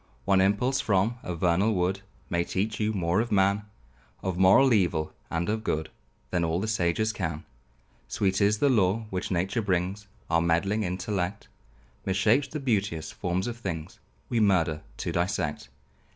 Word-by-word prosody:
One 95 -1 +4
impulse 105 +8 +2
from 105 +4 +1
a 90 - -4
vernal 90 +6 +2
wood 95 +2 0 0.3
May 85 -2 0
teach 105 +5 -2
you 110 0 +1
more 90 0 +1
of 120 0 -4
man; 100 +1 +2 0.6
Of 95 -2 -1
moral 95 +8 +6
evil 85 -7 +1 0.2
and 85 +1 -1
of 110 +1 -1
good, 80 -6 -2 0.4
Than 90 -2 +1
all 85 +1 0
the 110 - -2
sages 110 +1 +1
can. 80 -6 -4 0.6
Sweet 95 0 0
is 105 +1 +3
the 145 - +3
lore 110 -3 +2
which 90 -1 -3
nature 95 +5 0
brings; 95 +1 -1 0.2
Our 80 0 +2
meddling 85 +6 +1
intellect 95 +1 -3 0.5
Mishapes 105 +8 +2
the 150 - -4
beauteous 100 - -1
forms 90 +2 -2
of 120 -1 -4
things; 85 -6 -5 0.3
We 120 - 0
murder 85 -7 +2 0.2
to - - -3
dissect. 85 -3 -2
95 Hz, 160 wpm, -27 LUFS, 85-105 Hz, 0.6 s, moral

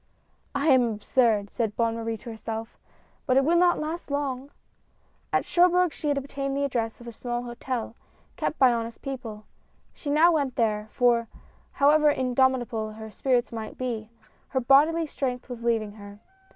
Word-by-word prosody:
"I 280 +3 +1
am 260 -3 +6
absurd," 210 -2 +1
said 225 -4 -2
Bonne 230 -1 +1
Marie 225 0 -3
to 235 - -9
herself, 225 0 -6 0.5
"but 255 -1 +3
it 270 - +4
will 335 +3 +3
not 350 0 +4
last 315 +2 -4
long! 280 -2 -2 0.4
" - - -40
At - - +1
Cherbourg 360 -1 +3
she 300 - -5
had 290 -1 +1
obtained 275 0 -3
the 280 - 0
address 235 -4 -2
of 240 - -11
a - - -5
small 240 +1 -4
hotel, 240 -1 -4 0.4
kept - - -2
by 255 -2 +5
honest 230 0 -4
people. 230 -6 -6 0.5
She 290 - -7
now 315 +4 +5
went 280 -6 0
there, 215 -2 0
for, 240 -2 +2 0.5
however 300 +2 +5
indomitable 250 -5 +1
her 220 0 -9
spirits 245 +3 0
might 225 -2 -6
be, 230 -4 -4 0.4
her 265 - -1
bodily 295 +6 +4
strength 255 -4 -3
was 245 -2 -7
leaving 225 -3 0
her. 205 -1 -12
250 Hz, 170 wpm, -26 LUFS, 225-280 Hz, 0.5 s, am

